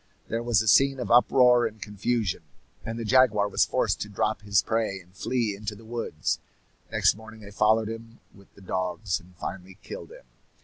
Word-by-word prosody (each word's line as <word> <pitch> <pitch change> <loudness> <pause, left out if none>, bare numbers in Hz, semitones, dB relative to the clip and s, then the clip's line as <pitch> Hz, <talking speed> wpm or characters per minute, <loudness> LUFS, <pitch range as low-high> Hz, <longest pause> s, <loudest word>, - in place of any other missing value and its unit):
There 115 +1 -1
was 120 -3 +2
a - - -6
scene 135 +3 +5
of 125 - -3
uproar 125 0 +5
and 110 0 -11
confusion, 105 -1 -2 0.4
and 115 0 -5
the 115 - -4
jaguar 110 -4 +4
was 100 - +2
forced - - 0
to 105 - -4
drop 105 +1 -1
his 100 -2 +2
prey 110 -4 -1
and 90 +1 -20
flee 115 0 -1
into 105 +1 -5
the 110 +2 -15
woods. 115 -9 -2 0.5
Next - - +3
morning 110 +1 -12
they 100 -1 -11
followed 110 +2 +3
him 115 +1 -8
with 100 -1 -19
the 100 - -16
dogs, 90 0 -2
and 90 +1 -19
finally 95 +1 -7
killed - - -8
him. - - -14
110 Hz, 190 wpm, -26 LUFS, 100-115 Hz, 0.5 s, scene